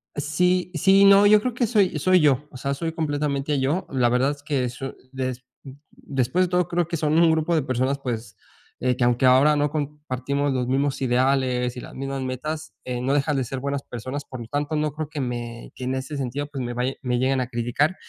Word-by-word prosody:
Sí. 180 +5 +1
Sí, 195 +5 +5
no, 200 +1 +7
yo 210 +1 +7
creo 250 +3 -2
que 240 +1 +1
soy 205 -8 +2
soy 185 +5 +4
yo, 145 -2 +3
o - - -10
sea, 140 +2 -2
soy 165 +4 -3
completamente 145 -2 -1
yo. 145 +8 0
La 125 -3 +2
verdad 125 +4 +2
es 145 0 -9
que 140 -3 0
eso 125 +2 -6 0.2
des 130 -1 -4 0.2
mm, 135 - -9 0.2
después 135 +7 0
de 180 - -5
todo, 180 -1 +1
creo 175 -1 0
que 170 - -2
son 155 +1 +1
un 165 -1 +6
grupo 160 +1 +1
de 155 - +3
personas, 130 +1 0
pues, 120 -5 -5 0.5
eh, 125 0 +1
que 125 - +1
aunque 120 +1 +2
ahora 135 +4 +6
no 145 0 +1
compartimos 145 -2 -2
los 125 -2 -1
mismos 135 +1 0
ideales 125 -1 +1
y - - -4
las - - -10
mismas 135 0 -4
metas, 150 +5 -4
eh, 125 -1 -3
no 130 +2 0
dejan 145 0 +1
de 130 - +1
ser 130 +2 -5
buenas 140 +1 -3
personas. 130 +5 -6
Por 130 -2 -8
lo 115 - -8
tanto, 145 +4 -2
no 150 0 0
creo 155 +1 -5
que 150 -1 -5
me 120 -2 -5
que 125 - -6
en 130 +1 -1
ese 130 +3 -4
sentido, 135 +2 -3
pues, 135 -2 -4
me 120 0 -3
vay 125 +2 -1
me 125 -1 0
lleguen 130 +1 +1
a 125 - -1
criticar, 120 +8 0
140 Hz, 230 wpm, -24 LUFS, 130-155 Hz, 0.5 s, no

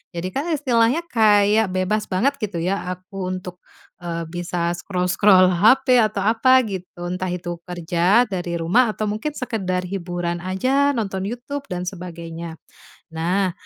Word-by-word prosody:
Jadi 170 +2 -3
kan 290 +5 -2
istilahnya 260 0 +2
kayak 215 - +4
bebas 200 +3 0
banget 255 +10 +1
gitu 205 -5 -3
ya 195 +3 0
aku 185 +1 -7
untuk, 185 -1 -6 0.4
eee, 170 -1 -4
bisa 175 0 -2
scroll-scroll 185 +1 +3
HP, 250 +8 +4
atau 215 -3 +1
apa 255 +5 +4
gitu, 180 -2 -6
entah 185 +1 -3
itu 175 -1 -5
kerja 175 +5 +2
dari 175 -3 -3
rumah 215 +9 +3
atau 215 - -2
mungkin 225 +8 -3
sekedar 190 -9 -2
hiburan 175 -2 -3
aja 265 +10 +1
nonton 195 -4 -2
Youtube 255 +5 -5
dan 180 0 -4
sebagainya. 170 -2 -7 0.6
Nah, 180 +4 0
190 Hz, 140 wpm, -21 LUFS, 175-225 Hz, 0.6 s, kayak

